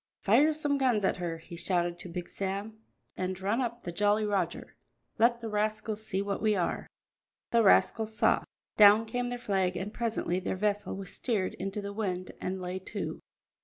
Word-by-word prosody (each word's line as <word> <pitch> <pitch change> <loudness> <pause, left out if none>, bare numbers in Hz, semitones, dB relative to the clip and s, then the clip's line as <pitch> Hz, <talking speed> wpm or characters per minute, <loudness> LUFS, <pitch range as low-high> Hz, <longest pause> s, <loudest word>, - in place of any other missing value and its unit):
"Fire 265 +10 +5
some 295 -2 0
guns 240 -7 +2
at - - +1
her," 170 -2 -3
he 165 +1 -11
shouted 175 0 0
to 180 - -7
Big 175 0 -5
Sam, 200 +3 -4 0.4
"and 185 0 -3
run 205 +6 0
up 235 -1 -3
the 175 - -4
Jolly 205 +4 +2
Roger; 205 -2 -2 0.4
let 235 +1 +4
the 230 - -4
rascals 215 0 -1
see 195 -2 -1
what 200 0 -3
we 215 -1 +3
are." 180 -3 -1 0.6
The 235 - +5
rascals 220 +1 +3
saw. - - +4 0.4
Down 210 +1 +8
came 245 +2 -2
their 245 - -3
flag, 190 -6 0
and 195 +4 -4
presently 220 -6 -1
their 190 - -2
vessel 205 0 -1
was 195 -2 -6
steered 210 -7 -1
into 195 +2 -4
the 200 0 -5
wind 185 -4 -3
and 185 +1 -3
lay 180 +1 -4
to. 190 - -5
205 Hz, 185 wpm, -30 LUFS, 185-220 Hz, 0.6 s, Down